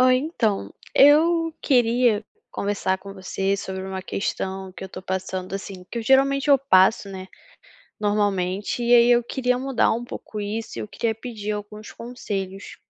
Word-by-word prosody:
Oi, 255 0 +6
então, 230 - -1 0.2
eu 330 +3 +5
queria 240 -4 +3 0.3
conversar 200 -2 -1
com 195 +1 -10
você 195 +1 -2
sobre 190 -1 -5
uma 190 0 -5
questão 190 0 -3
que 190 - -9
eu - - -7
tô 185 - -9
passando 185 0 -4
assim, 195 -1 -6
que 235 - -4
eu - - -3
geralmente 275 +3 +3
eu 280 - +8
passo, 200 -6 +3
né, 190 -1 -7 0.7
normalmente, 205 -1 0
e 240 0 +4
aí, 240 0 +6
eu 240 0 +4
queria 250 0 0
mudar 265 -1 +1
um 235 +2 -3
pouco 215 -2 -7
isso 215 +2 -4
e - - -3
eu - - -5
queria 225 +1 -2
pedir 220 -3 -6
alguns 210 0 -6
conselhos. 200 -5 -6
210 Hz, 170 wpm, -23 LUFS, 190-245 Hz, 0.7 s, eu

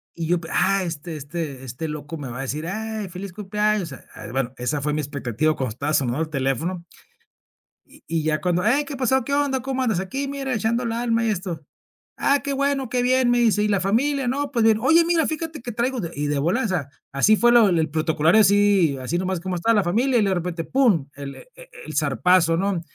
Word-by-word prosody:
Y 165 -2 -4
yo 175 0 +2
pe 160 - -9
ah, 195 +1 +2
este 165 -1 -5
este 145 -2 -6
este 130 +6 -5
loco 150 +1 -6
me 140 -4 -6
va 125 +2 -7
a - - -2
decir: 150 +5 -4
"Ay, 220 +1 -4
feliz 185 +1 -7
cumpleaños", 210 -3 -1
eh, 135 - -11
ay, - - -9
bueno, 130 -1 -1
esa 130 +4 -2
fue 150 +1 -1
mi 155 - 0
expectativa 145 +1 -1
cuando 130 -3 -2
estaba 145 +5 -3
sonando, 135 0 +1
el 160 - -2
teléfono. 155 +6 -2 1.0
Y - - -20
y, 160 -1 -1
ya 155 -1 0
cuando, 180 +1 0
ey, 280 +5 +3
¿qué 280 - -6
pasó? 265 0 +1
¿Qué 280 - -3
onda? 280 -3 +1
¿Cómo 265 0 -2
andas? 220 -8 +1
Aquí, 270 +9 -3
mira, 275 -2 -3
echando 230 +3 0
el 230 - -2
alma 230 0 0
y 225 - +1
esto. 175 -6 -4 0.6
"Ah, 280 0 +3
qué 280 - -3
bueno, 275 -1 0
qué 250 +1 0
bien", 255 0 +3
me 245 - +3
dice: 220 -3 +3
"¿Y 210 - +1
la 200 -3 +1
familia? 260 +8 +1
¿No? 280 +3 -1
Pues 235 -5 +1
bien". 220 -1 +5
"Oye, 320 +7 +5
mira, 335 -3 +2
fíjate 315 -3 -4
que 245 - -5
traigo 245 +3 -1
de", 170 -4 -4
y 145 +1 -2
de 145 -1 0
volada, 205 - +1
o - - -3
sea, 160 -8 -2 0.2
así 210 +11 +4
fue 240 +2 +4
lo 230 -4 +6
el 160 -4 +1
protocolario 160 +5 +3
así 200 -7 +4
así 140 +7 -2
nomás 185 0 -1
como 185 0 -4
esta 200 +7 +2
la 205 -4 +2
familia 240 +8 +2
y 210 - +3
de 195 -1 +1
repente 175 -1 -3
pum 215 - +2
el 140 -1 -8
e - - -14
e - - -14 0.2
el - - -7
zarpazo, 180 -2 +3
¿no? 195 -1 0
190 Hz, 240 wpm, -23 LUFS, 155-240 Hz, 1.0 s, lo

